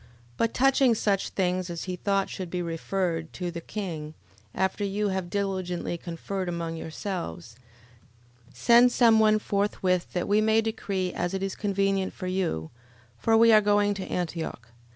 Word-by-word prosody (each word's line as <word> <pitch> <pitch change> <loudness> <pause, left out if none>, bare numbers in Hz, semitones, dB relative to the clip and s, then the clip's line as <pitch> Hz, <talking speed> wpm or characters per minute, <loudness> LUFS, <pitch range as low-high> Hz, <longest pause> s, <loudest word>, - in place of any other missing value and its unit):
11:36. - - -23 0.3
But 230 - +1
touching 265 -2 +4
such 200 -2 0
things 185 -1 -1
as 170 -1 -4
he 185 -1 -4
thought 195 +1 0
should 185 -2 -6
be 180 0 -2
referred 165 0 -2
to 180 -2 -4
the 170 0 -6
king, 165 -7 -5 0.4
after 190 +2 0
you 205 +1 0
have 190 -2 -2
diligently 185 -3 -2
conferred 175 +2 -4
among 170 -1 -3
yourselves, 160 - -5 1.0
send 240 +1 +5
some 230 -3 +5
one 215 0 +5
forthwith, 200 -3 0
that 180 - -1
we 210 +1 +3
may 220 +1 +3
decree 200 -5 -2
as 175 +2 -2
it 190 - -2
is 195 -1 -2
convenient 195 -1 0
for - - -7
you: 180 - -2 0.5
for 225 - +3
we 230 0 +7
are 215 - +7
going 205 0 +3
to 195 -1 -5
Antioch. 165 -9 -4
190 Hz, 165 wpm, -27 LUFS, 175-205 Hz, 1.0 s, we